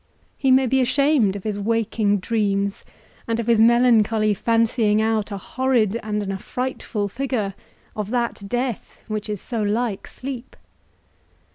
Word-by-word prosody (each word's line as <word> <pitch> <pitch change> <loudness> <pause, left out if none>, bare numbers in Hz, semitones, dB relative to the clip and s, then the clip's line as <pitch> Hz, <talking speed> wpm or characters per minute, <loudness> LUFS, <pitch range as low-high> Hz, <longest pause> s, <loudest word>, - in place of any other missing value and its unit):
he 270 - 0
may 260 +1 +5
be 265 +2 +2
ashamed 270 -5 +2
of 200 - -6
his 210 -2 -3
waking 220 -1 +1
dreams, 200 -1 -1 0.4
and 230 0 -1
of 230 - -2
his 230 -1 +4
melancholy 225 -2 +4
fancying 225 0 +2
out 220 -1 0
a 200 - -4
horrid 235 -1 0
and 210 -1 -2
an 195 - -3
affrightful 210 +1 -3
figure 235 -3 -2 0.4
of 210 -2 -3
that 235 -4 -2
death 245 -1 -3
which 215 -1 -4
is 210 -2 -3
so 230 +2 -4
like 210 0 -1
sleep. 260 -1 -7
225 Hz, 145 wpm, -22 LUFS, 205-245 Hz, 0.4 s, may